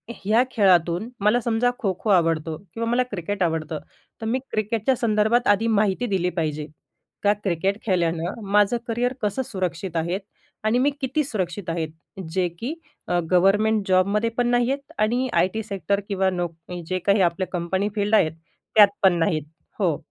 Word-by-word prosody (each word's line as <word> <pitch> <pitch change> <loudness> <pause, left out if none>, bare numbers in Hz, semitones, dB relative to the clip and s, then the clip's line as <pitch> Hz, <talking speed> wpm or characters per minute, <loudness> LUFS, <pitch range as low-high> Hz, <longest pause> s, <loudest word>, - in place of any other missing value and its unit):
ह्या 220 +5 +2
खेळातून 185 0 +3
मला 210 +4 +3
समजा, 235 +2 +1
खो-खो 200 -1 -2
आवडतो 165 -4 +2
किंवा 225 +5 -5
मला 245 +2 +3
क्रिकेट 200 +1 -4
आवडतं, 160 -2 -1 0.4
तर - - -4
मी 235 +4 0
क्रिकेटच्या 220 +4 0
संदर्भात 230 +1 +2
आधी 205 +3 +3
माहिती 210 +3 +1
दिली 185 -3 0
पाहिजे. 155 -3 -2 0.6
का 205 0 +5
क्रिकेट 195 +3 0
खेळल्यानं 175 +2 0
माझं 210 +3 +4
करियर 240 +2 0
कसं 210 +5 0
सुरक्षित 185 -2 -4
आहे 175 +4 -1 0.4
आणि 220 +3 +2
मी 275 - +3
किती 270 +3 0
सुरक्षित 190 - -3
आहेत. 165 -1 -2 0.4
जे 185 0 +1
की 260 +7 -3 0.3
अ, 175 0 +1
गव्हर्नमेंट 205 +3 +3
जॉबमध्ये 200 +5 +2
पण 245 0 +2
नाहीयेत 255 +4 0
आणि 240 +4 +1
आय 170 +2 +4
टी 220 - -3
सेक्टर 200 -1 -1
किंवा 190 -1 +1
नोक 175 -2 -3 0.3
जे 185 0 -1
काही 200 +2 +2
आपल्या 175 +1 +1
कंपनी 185 +4 -1
फील्ड 205 +1 +2
आहेत, 155 -7 +4 0.4
त्यात 210 -2 +9 0.2
पण 190 - +6
नाहीत. 155 -2 +1 0.4
हो, 170 -7 +2
200 Hz, 160 wpm, -23 LUFS, 175-225 Hz, 0.6 s, त्यात